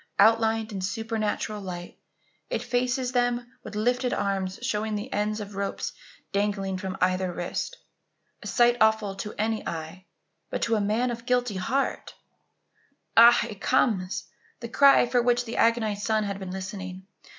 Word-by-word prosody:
Outlined 225 +1 +4
in 195 -2 -4
supernatural 215 +1 -2
light, 175 -2 -7 0.5
it 225 - -2
faces 250 +1 0
them 245 -1 +1 0.2
with 215 - -8
lifted 245 +3 +1
arms 195 -2 -1
showing 215 -3 -1
the 210 +6 -5
ends 210 +1 0
of 205 -1 -7
rope 200 0 -3 0.5
dangling 195 -2 -1
from 190 0 -4
either 185 0 +1
wrist. 175 - -4 0.6
A - - -7
sight 240 -1 +4
awful 220 -2 +3
to 210 +1 -5
any 220 +1 0
eye, 165 +3 -6 0.4
but - - -3
to 230 - 0
the 220 -2 +3
man 220 +5 +1
of 235 +1 -7
guilty 245 -5 +1
heart 260 +9 -1 1.0
Ah! 235 +1 +8
it 205 -2 -9
comes 205 -8 +1 0.3
the 235 - -6
cry 275 +1 +6
for 245 0 +2
which 245 0 +2
the 230 - -5
agonized 220 -3 +2
son 220 -1 +1
had 200 -1 -3
been 190 -2 -6
listening! 190 0 -6
215 Hz, 155 wpm, -26 LUFS, 195-240 Hz, 1.0 s, Ah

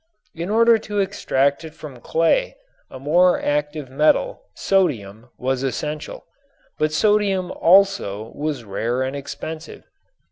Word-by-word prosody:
In 170 +3 -5
order 230 +1 +5
to 205 -1 -6
extract 140 -8 0
it 160 -1 -10
from 140 -5 -10
clay 165 - +1 0.3
a - - -9
more 175 +7 +3
active 150 -2 -2
metal, 155 - +2
sodium, 120 - 0
was 130 0 -1
essential. 150 +3 -4 0.5
But 155 0 +1
sodium 195 +1 +1
also 170 - +2
was 145 -4 -3
rare 115 +5 -2
and 130 +1 -3
expensive. 155 +3 -7
155 Hz, 120 wpm, -21 LUFS, 130-190 Hz, 0.5 s, order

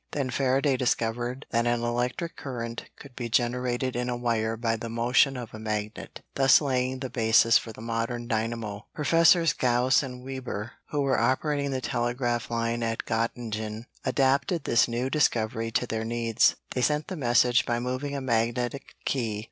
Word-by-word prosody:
Then 135 -3 -1
Faraday 135 +1 +2
discovered 120 +1 -1
that 115 0 +1
an 120 0 +1
electric 125 +8 -2
current 115 -3 -5
could 135 -3 -13
be 120 -2 -4
generated 125 +1 0
in 125 0 -1
a 120 - -1
wire 115 -2 0
by 115 0 0
the 115 +1 -6
motion 125 +4 +2
of 120 -3 -7
a 110 - -8
magnet, 110 -1 -4
thus 135 -1 +6
laying 130 -2 -1
the 130 - -3
basis 115 -1 +5
for 115 - -8
the 110 - -12
modern 115 +1 -2
dynamo. 110 -2 -3
Professors 165 0 +4
Gauss 125 -1 +3
and 125 -3 -7
Weber, 130 -5 -5 0.2
who 145 - -1
were 135 -4 +2
operating 140 +4 +1
the 130 -1 -2
telegraph 120 -2 -1
line 115 0 -1
at 115 -1 -2
Göttingen, 110 -1 -3 0.2
adapted 140 +5 +1
this 115 - +3
new 120 +2 -1
discovery 115 -6 +1
to 125 - +1
their 110 -2 -3
needs. 115 0 +2 0.2
They 125 - -1
sent 150 +3 +1
the 190 - -5
message 120 -3 +3
by 120 - +1
moving 130 +3 -3
a 140 - -3
magnetic 120 +2 -1
key. 115 -6 -1
120 Hz, 170 wpm, -27 LUFS, 115-130 Hz, 0.2 s, thus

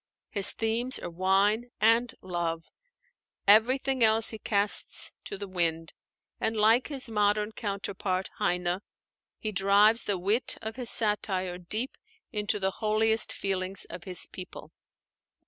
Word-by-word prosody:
His 200 -2 +5
themes 230 +3 0
are - - -7
wine 195 +6 +1
and 230 +2 +3
love. 170 -2 -3 0.8
Everything 255 +5 +4
else 220 0 +4
he 220 - -5
casts 205 -1 +1
to 200 - -5
the 200 +1 -7
wind; 165 -3 -2 0.5
and 220 0 -1
like 225 +4 +4
his 275 -3 -4
modern 210 -1 0
counterpart, 195 -3 -4
Heine, 180 +1 0 0.6
he 215 - -4
drives 205 +3 +3
the 200 -2 -1
wit 205 +7 0
of 220 0 -7
his 245 -2 -1
satire 190 -4 0
deep 215 +8 -4 0.3
into 210 -2 0
the 190 0 0
holiest 220 +1 +2
feelings 190 0 -2
of 175 +1 -9
his 180 -2 0
people. 185 -1 -11
205 Hz, 130 wpm, -28 LUFS, 185-225 Hz, 0.8 s, His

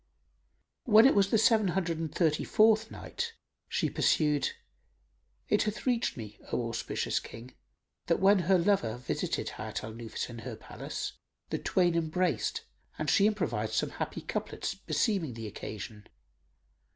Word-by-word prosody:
When 220 0 +7
it 270 - +7
was 200 -1 +3
the 225 - +4
Seven 220 -1 +4
Hundred 175 -3 -1
and 160 -2 -3
Thirty 155 -3 +1
fourth 220 0 +4
Night, 465 -1 -5 0.4
She - - +1
pursued, 150 -2 +2 1.0
It 210 - +3
hath 210 0 -2
reached 245 - +1
me, 105 -2 -8
O 120 - 0
auspicious 115 - -1
King, 120 +3 -11 0.5
that - - +2
when 195 +1 +5
her 185 +2 +4
lover 170 - +1
visited 125 - -2
Hayat - - -4
al 110 +1 -6
Nufus 115 0 -5
in 120 -1 -8
her 115 0 -6
palace, - - -6 0.4
the - - -1
twain 175 -2 +2
embraced 170 +2 0 0.3
and - - 0
she 200 - +5
improvised 120 - -1
some - - 0
happy - - -4
couplets - - -3
beseeming 175 - -1
the 115 -1 -6
occasion. 105 0 -7
170 Hz, 150 wpm, -30 LUFS, -, 1.0 s, When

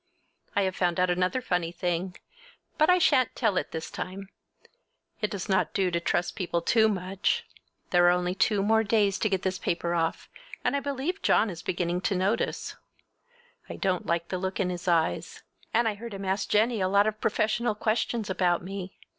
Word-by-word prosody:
I 200 - +3
have 190 -1 -1
found 175 -1 0
out 180 0 +3
another 180 +8 0
funny 175 -4 -1
thing, 175 +1 -2 0.6
but 310 - +5
I 360 - +6
shan't 255 -8 +3
tell 220 -6 +1
it - - -1
this 160 0 -5
time! 195 +1 -6 0.9
It 210 - 0
does 195 -3 -5
not 190 -1 +1
do 190 -3 +2
to 170 - +1
trust 175 0 -1
people 175 -3 -1
too 220 +3 +4
much. 190 -1 -1 0.5
There 175 -1 +5
are - - +7
only 180 0 +1
two 200 +1 +2
more 220 +2 +3
days 205 -2 +2
to 215 - +1
get 190 -2 -1
this 185 0 -1
paper 170 0 -1
off, 165 -1 -1 0.4
and - - +1
I - - +2
believe 285 +8 -3
John 215 -1 +3
is 170 -1 -8
beginning 175 0 -1
to 195 +1 0
notice. 195 +5 -1 0.9
I - - -5
don't 185 -3 -1
like 170 0 -1
the 185 - -2
look 190 +1 -3
in 185 -2 +1
his 180 +1 -6
eyes. 165 -2 0 0.3
And 230 +1 +2
I 220 - +1
heard 220 +1 -8
him 195 0 -6
ask 190 +1 -1
Jennie 220 +1 +2
a 185 - +2
lot 200 +2 +4
of 215 0 -2
professional 220 +1 +1
questions 220 0 -1
about 180 -2 +1
me. 190 0 -7
190 Hz, 195 wpm, -27 LUFS, 180-215 Hz, 0.9 s, are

